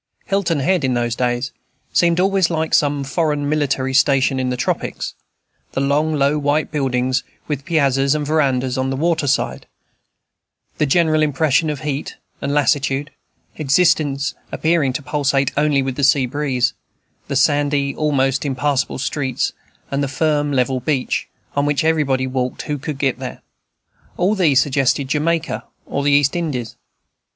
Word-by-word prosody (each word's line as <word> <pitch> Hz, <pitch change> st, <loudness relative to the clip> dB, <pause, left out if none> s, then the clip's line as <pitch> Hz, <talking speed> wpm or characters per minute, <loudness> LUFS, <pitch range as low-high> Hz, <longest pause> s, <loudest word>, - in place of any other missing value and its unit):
Hilton 180 Hz, -7 st, 0 dB
Head, 180 Hz, +4 st, +1 dB
in 130 Hz, -2 st, +1 dB
those 120 Hz, -1 st, 0 dB
days, 125 Hz, +1 st, -1 dB, 0.4 s
seemed 170 Hz, 0 st, +3 dB
always 190 Hz, -2 st, +3 dB
like 160 Hz, -1 st, -2 dB
some 145 Hz, -1 st, +2 dB
foreign 145 Hz, 0 st, -1 dB
military 135 Hz, -3 st, 0 dB
station 135 Hz, 0 st, +3 dB
in 130 Hz, -1 st, -1 dB
the 125 Hz, -, -2 dB
tropics. -, -, -2 dB, 0.6 s
The -, -, -1 dB
long, 145 Hz, +3 st, +1 dB
low, 145 Hz, +1 st, +2 dB
white 145 Hz, +2 st, 0 dB
buildings, 130 Hz, -3 st, 0 dB, 0.2 s
with 145 Hz, -2 st, -3 dB
piazzas 140 Hz, -4 st, +2 dB
and 150 Hz, -1 st, -2 dB
verandas 130 Hz, -4 st, +1 dB
on 130 Hz, 0 st, 0 dB
the 135 Hz, -, -1 dB
water 160 Hz, +1 st, 0 dB
side; 135 Hz, -, -1 dB, 1.1 s
the 150 Hz, -, +2 dB
general 155 Hz, +1 st, +3 dB
impression 155 Hz, +1 st, +2 dB
of 150 Hz, -3 st, -4 dB
heat 145 Hz, -2 st, -4 dB, 0.2 s
and 140 Hz, -, -2 dB
lassitude, 140 Hz, 0 st, +1 dB, 0.5 s
existence 145 Hz, -2 st, +2 dB, 0.2 s
appearing 160 Hz, -4 st, +1 dB
to 145 Hz, -, -4 dB
pulsate 140 Hz, -2 st, +1 dB
only 145 Hz, -2 st, +2 dB
with 130 Hz, -1 st, -4 dB
the 140 Hz, -, -1 dB
sea 135 Hz, -1 st, +4 dB
breeze; 125 Hz, -2 st, 0 dB, 0.5 s
the -, -, -3 dB
sandy, 145 Hz, 0 st, +2 dB
almost 135 Hz, -3 st, +1 dB
impassable 140 Hz, 0 st, -1 dB
streets; 135 Hz, -1 st, -2 dB, 0.4 s
and 140 Hz, +1 st, 0 dB
the 140 Hz, -, 0 dB
firm, 145 Hz, +1 st, 0 dB
level 130 Hz, -1 st, +1 dB
beach, 130 Hz, 0 st, -1 dB, 0.3 s
on 145 Hz, 0 st, +1 dB
which 145 Hz, 0 st, +1 dB
everybody 145 Hz, -5 st, +1 dB
walked 130 Hz, -1 st, -2 dB
who 145 Hz, -1 st, -3 dB
could 150 Hz, +1 st, -5 dB
get 135 Hz, -2 st, 0 dB
there: 130 Hz, -1 st, -7 dB, 0.7 s
all 185 Hz, +4 st, +2 dB
these 160 Hz, -10 st, +3 dB
suggested 135 Hz, -1 st, +1 dB
Jamaica 160 Hz, +3 st, 0 dB, 0.2 s
or 140 Hz, -, -2 dB
the 145 Hz, -, +2 dB
East 140 Hz, +1 st, +3 dB
Indies. 140 Hz, -9 st, -3 dB
140 Hz, 155 wpm, -19 LUFS, 135-150 Hz, 1.1 s, sea